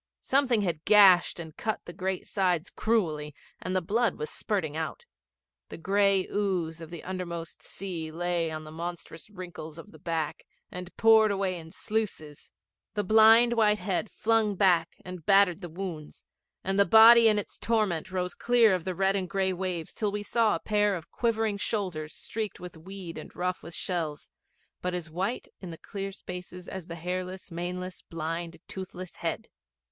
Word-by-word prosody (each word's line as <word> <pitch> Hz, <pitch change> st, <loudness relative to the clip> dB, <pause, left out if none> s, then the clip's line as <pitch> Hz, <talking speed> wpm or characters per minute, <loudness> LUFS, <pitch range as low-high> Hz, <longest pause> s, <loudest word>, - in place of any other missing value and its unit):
Something 260 Hz, -5 st, +3 dB
had 170 Hz, -4 st, -2 dB
gashed 195 Hz, -5 st, +6 dB
and 160 Hz, -2 st, -8 dB
cut 220 Hz, -2 st, -2 dB
the 175 Hz, -, -8 dB
great 190 Hz, +1 st, -3 dB
sides 180 Hz, -4 st, 0 dB
cruelly 155 Hz, -10 st, 0 dB, 0.3 s
and 185 Hz, +1 st, -2 dB
the 185 Hz, -, +1 dB
blood 220 Hz, +3 st, +1 dB
was 150 Hz, -, -5 dB
spurting 165 Hz, -8 st, -2 dB
out. 160 Hz, -, -4 dB, 0.6 s
The -, -, -8 dB
gray 195 Hz, +2 st, +2 dB
ooze 180 Hz, -5 st, -1 dB
of 165 Hz, -, -8 dB
the 170 Hz, -2 st, -8 dB
undermost 170 Hz, -3 st, -5 dB
sea 170 Hz, -5 st, -6 dB
lay 170 Hz, 0 st, -1 dB
in 155 Hz, 0 st, -5 dB
the 155 Hz, -, -10 dB
monstrous 170 Hz, +1 st, -7 dB
wrinkles 175 Hz, -5 st, -8 dB
of 185 Hz, +5 st, -11 dB
the -, -, -15 dB
back, 165 Hz, -4 st, -3 dB, 0.3 s
and 180 Hz, 0 st, -6 dB
poured 220 Hz, -1 st, +6 dB
away 195 Hz, -3 st, -1 dB
in 160 Hz, -1 st, -11 dB
sluices. 175 Hz, -8 st, -4 dB, 0.5 s
The 205 Hz, -, 0 dB
blind 225 Hz, +3 st, +7 dB
white 215 Hz, -2 st, +4 dB
head 190 Hz, +2 st, -2 dB
flung 220 Hz, -2 st, +1 dB
back 175 Hz, -4 st, +3 dB
and 180 Hz, -2 st, -7 dB
battered 195 Hz, 0 st, +4 dB
the 175 Hz, -, -6 dB
wounds, 165 Hz, -3 st, -7 dB, 0.4 s
and 195 Hz, +1 st, 0 dB
the 200 Hz, -, +6 dB
body 230 Hz, +1 st, +9 dB
in 215 Hz, -1 st, +5 dB
its 205 Hz, -, -4 dB
torment 210 Hz, -7 st, 0 dB
rose 180 Hz, -1 st, -2 dB
clear 235 Hz, -4 st, +4 dB
of 180 Hz, -2 st, -2 dB
the 185 Hz, -1 st, -2 dB
red 195 Hz, +2 st, +2 dB
and 185 Hz, -3 st, -2 dB
gray 190 Hz, -1 st, +1 dB
waves 180 Hz, -3 st, -3 dB
till 210 Hz, -2 st, -1 dB
we 205 Hz, 0 st, -3 dB
saw 225 Hz, -1 st, +2 dB
a -, -, -3 dB
pair 210 Hz, 0 st, +1 dB
of 165 Hz, -2 st, -9 dB
quivering 225 Hz, -3 st, 0 dB
shoulders 180 Hz, -9 st, -3 dB
streaked 220 Hz, -2 st, -4 dB
with 180 Hz, -1 st, -9 dB
weed 180 Hz, +1 st, -8 dB
and -, -, -11 dB
rough 180 Hz, +1 st, -2 dB
with 170 Hz, +1 st, -9 dB
shells, 160 Hz, -, -3 dB, 0.5 s
but 180 Hz, 0 st, -2 dB
as 165 Hz, -3 st, -5 dB
white 190 Hz, +9 st, -2 dB
in 185 Hz, -, -8 dB
the 165 Hz, -, -7 dB
clear 195 Hz, +2 st, -6 dB
spaces 180 Hz, -1 st, -8 dB
as 185 Hz, -3 st, -7 dB
the 170 Hz, -, -6 dB
hairless, 185 Hz, +2 st, -5 dB
maneless, 180 Hz, +2 st, -5 dB
blind, 165 Hz, +1 st, -4 dB
toothless 185 Hz, -1 st, -8 dB
head. -, -, -3 dB
185 Hz, 175 wpm, -28 LUFS, 170-205 Hz, 0.6 s, body